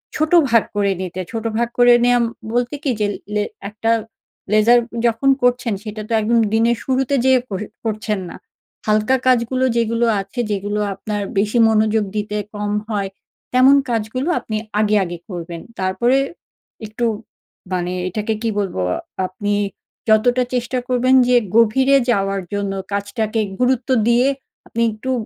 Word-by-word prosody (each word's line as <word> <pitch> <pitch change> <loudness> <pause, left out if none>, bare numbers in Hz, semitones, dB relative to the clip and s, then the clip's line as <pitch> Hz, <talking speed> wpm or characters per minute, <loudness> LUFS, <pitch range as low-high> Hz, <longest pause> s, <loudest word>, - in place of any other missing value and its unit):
ছোট 310 +1 0 0.2
ভাগ 230 -1 +4
করে 200 -1 +2
নিতে। 185 0 -5
ছোট 225 -1 -4
ভাগ 235 0 +1
করে 245 0 +7
নেওয়া 245 0 +4 0.3
বলতে 245 +3 0
কি 275 - +1
যে, 210 - +2 0.3
লে 210 0 +1 0.3
একটা 220 +2 -1 0.6
ledger 225 +3 +6 0.3
যখন 235 +4 +1
করছেন 245 -2 +2
সেটা 215 -1 -6
তো - - -1
একদম 230 +2 +2
দিনের 230 +1 +3
শুরুতে 265 +1 +1
যে 265 - +5 0.2
কর 195 0 -4 0.2
করছেন 215 -1 -2
না। - - -9 0.5
হালকা 215 +4 +3
কাজগুলো 255 +1 +2
যেগুলো 230 +1 +1 0.2
আছে, 195 +5 -9
যেগুলো 205 +1 -2 0.2
আপনার 205 +1 -4 0.2
বেশি 215 +4 +1
মনোযোগ 220 0 +2
দিতে 210 0 -2 0.2
কম 205 0 -2 0.2
হয়, 200 -3 -1 0.4
তেমন 260 +2 +6
কাজগুলো 235 +6 -2
আপনি 215 - -4 0.2
আগে, 215 0 +2
আগে 175 -1 -5
করবেন। 170 -2 -6 0.2
তারপরে 190 +8 +2 0.7
একটু 225 +3 -3 0.7
মানে 180 0 -1 0.2
এটাকে 215 +4 -2
কি 225 - +1
বলবো, 190 - -2 0.5
আপনি 205 +3 -3 0.6
যতটা 245 +4 +4
চেষ্টা 245 +1 -1
করবেন 255 +1 +3
যে 250 - +5 0.2
গভীরে 260 +5 +5
যাওয়ার 195 -2 0
জন্য 200 -1 -2 0.2
কাজটাকে 215 +2 -1 0.2
গুরুত্ব 255 0 +1 0.2
দিয়ে 240 +2 +4 0.4
আপনি 230 - -3
একটু 220 +5 -5
220 Hz, 145 wpm, -19 LUFS, 205-245 Hz, 0.7 s, করে